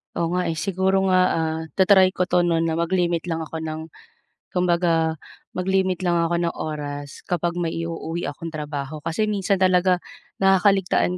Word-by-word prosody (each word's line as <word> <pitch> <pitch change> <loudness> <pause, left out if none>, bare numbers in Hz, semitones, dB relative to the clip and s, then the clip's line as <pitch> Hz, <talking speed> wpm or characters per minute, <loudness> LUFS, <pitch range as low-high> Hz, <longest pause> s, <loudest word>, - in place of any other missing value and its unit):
Oo, 165 -1 0
nga, 180 - 0
eh, 165 - 0
siguro 190 +2 +1
nga, 185 - +4
ah, 160 0 -1
ta-try 190 -1 +5
ko 180 0 -1
'to 175 0 +3
'no, 165 -1 +2
na 165 -1 0
mag-limit 170 0 0
lang 165 -2 -2
ako 160 +1 -6
ng, 160 0 -4 0.7
kumbaga 170 -3 +1 0.4
mag-limit 185 0 0
lang 175 - +2
ako 170 +1 +1
ng 170 -1 -1
oras 145 -2 -6
kapag 175 0 -1
may 170 -2 -1
i-uuwi 165 -1 -4
akong 165 +3 -7
trabaho. 150 -1 -5
Kasi 165 +8 -1
minsan 200 -2 0
talaga 185 -1 +3 0.4
nakakaligtaan 195 -1 +3
170 Hz, 160 wpm, -23 LUFS, 160-185 Hz, 0.7 s, ta-try